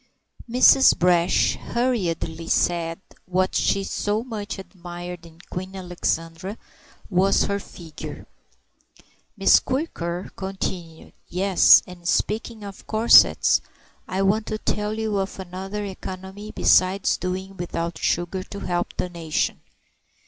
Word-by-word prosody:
Mrs. 255 +2 +6
Brash 175 0 +3
hurriedly 170 -9 -2
said 165 -1 0 0.3
what 185 +1 0
she 195 - +1
so 210 +3 -1
much 220 -4 -5
admired 175 -2 -9
in 165 -1 -18
Queen 185 +2 -5
Alexandra 175 +1 -3 0.5
was 195 0 +3
her 200 0 -1
figure. 165 -5 -10 1.1
Miss - - +6
Quirker 185 - -3
continued, 185 -4 -5
"Yes, 190 0 +5
and 175 -1 -10
speaking 220 +3 -1
of 200 -1 -10
corsets 220 +2 +5 0.5
I 190 +1 -1
want 210 +3 +1
to 215 - -2
tell 210 0 -2
you 220 -2 -1
of 195 0 -3
another 190 +3 -5
economy 190 +1 -8
besides 190 +1 +3
doing 185 +2 -4
without 170 -1 -4
sugar 175 +2 -1
to 200 +2 -9
help 175 -1 -2
the - - -1
nation. 165 -3 -2
190 Hz, 115 wpm, -23 LUFS, 175-205 Hz, 1.1 s, Mrs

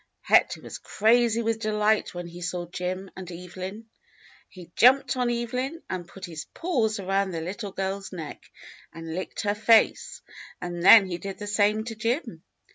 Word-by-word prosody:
Hector - - +3
was - - -8
crazy 230 +1 +2
w^ith 225 0 0
delight 215 -2 +1
when 175 0 -5
he 175 +1 -10
saw 175 0 -3
Jim 185 +2 -5
and 185 -1 -8
Evelyn. 185 +5 -8 0.6
He 175 -3 -13
jumped 265 +3 +5
on 250 -1 0
Evelyn 250 +6 -3
and 180 -2 -4
put 195 - -9
his 160 -3 -7
paws 235 - 0
around 195 0 0
the 170 -3 -4
little 195 +5 -5
girl's 195 +1 -4
neck 160 -5 -7 0.5
and 165 +1 -9
Kcked 180 +3 -4
her 205 -1 0
face; 220 +1 +3 0.4
and 175 -1 -5
then 205 +2 +9
he 175 -2 -5
did 195 +2 -6
the 210 - -6
same 210 +1 +2
to 230 0 -6
Jim. 230 +7 -2
200 Hz, 170 wpm, -26 LUFS, 180-225 Hz, 0.6 s, then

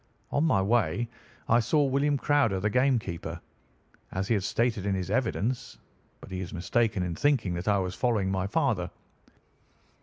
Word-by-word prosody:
On 145 - +2
my 105 -12 +3
way 115 0 +1 0.4
I 115 - +5
saw 145 +6 +2
William 140 +2 +2
Crowder, 140 -9 +2
the 105 +3 0
game 130 +2 +3
keeper, 90 -6 -5 0.7
as 95 +1 -2
he - - +4
had 105 - +1
stated 115 0 0
in 100 - +1
his 95 -1 -3
evidence; 125 -1 -1 0.4
but - - -12
he 95 - -3
is 90 - -6
mistaken 105 +2 +1
in 90 -1 -2
thinking 115 - +1
that 85 +3 -4
I 105 -1 +4
was 95 -1 -2
following 100 -2 0
my 95 0 -1
father. 110 - 0
110 Hz, 175 wpm, -28 LUFS, 95-125 Hz, 0.7 s, I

